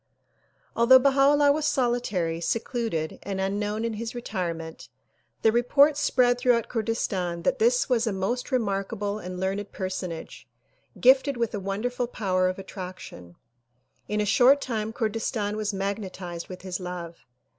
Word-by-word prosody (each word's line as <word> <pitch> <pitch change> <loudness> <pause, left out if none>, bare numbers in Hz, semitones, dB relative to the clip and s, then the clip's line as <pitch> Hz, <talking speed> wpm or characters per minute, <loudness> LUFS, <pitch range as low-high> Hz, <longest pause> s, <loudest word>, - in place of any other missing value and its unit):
Although 275 +4 +5
solitary, 240 - 0
secluded 225 -5 -2
and 195 -1 -4
unknown 205 +3 -1
in 230 - -2
his 225 +2 -5
retirement, 170 -8 -5 0.5
the 220 - +5
report 280 +6 +4
spread 250 -4 +2
throughout 245 -2 +2
Kurdistan 195 -7 -2
that 270 -1 +1
this 240 +3 +3
was 240 -2 +1
a - - +1
most 200 +8 -2
remarkable 205 -2 -1
and 180 -2 -7
learned 195 +2 -2
personage 185 -3 -5 0.5
gifted 265 +1 +4
with 235 -1 -1
a 205 - -2
wonderful 225 +6 -2
power 185 -5 0
of 185 - -4
attraction. 185 - -9 0.7
In 210 - -1
a 210 - +1
short 255 +7 +5
time 220 -5 -3
Kurdistan 220 -2 -2
was 215 -1 -1
magnetized 195 -3 -4
with 185 -1 -9
his 185 -1 -4
love. 175 -2 -6
210 Hz, 135 wpm, -26 LUFS, 185-245 Hz, 0.7 s, Although